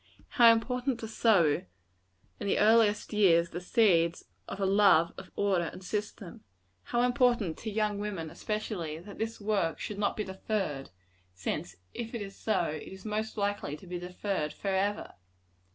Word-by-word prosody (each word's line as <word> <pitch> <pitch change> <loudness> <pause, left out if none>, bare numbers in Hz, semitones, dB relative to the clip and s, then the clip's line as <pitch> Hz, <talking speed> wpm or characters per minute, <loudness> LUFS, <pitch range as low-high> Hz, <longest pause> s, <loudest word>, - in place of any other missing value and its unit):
How 235 -2 +7
important 250 +2 0
to 225 - -4
sow, 200 -9 +3 0.8
in 205 - -4
the - - +2
earliest 215 -1 +4
years, 170 -5 +4
the 175 - -5
seeds 175 -4 +2 0.2
of - - -6
a 195 - +1
love 195 -4 +4
of - - -10
order 190 -4 +1
and 185 - -8
system! 205 -2 -5 0.4
How 240 0 +1
important 245 - +2
to 225 - -4
young 210 -1 0
women, 195 -7 -4
especially, 205 -7 -4
that 195 +5 -11
this 225 +1 -3
work 200 -6 0
should 205 -1 -5
not 205 - 0
be 215 - -1
deferred; 190 -7 -3 0.5
since 90 - -4 0.2
if 235 0 -5
it 230 - -3
is 195 0 -9
so, 215 -5 0
it 155 -2 -4
is 190 +1 -11
most 215 +1 -3
likely 200 -8 -2
to 170 - -15
be 180 0 -5
deferred 180 -3 -3
forever. 200 +1 -1
205 Hz, 165 wpm, -30 LUFS, 175-220 Hz, 0.8 s, How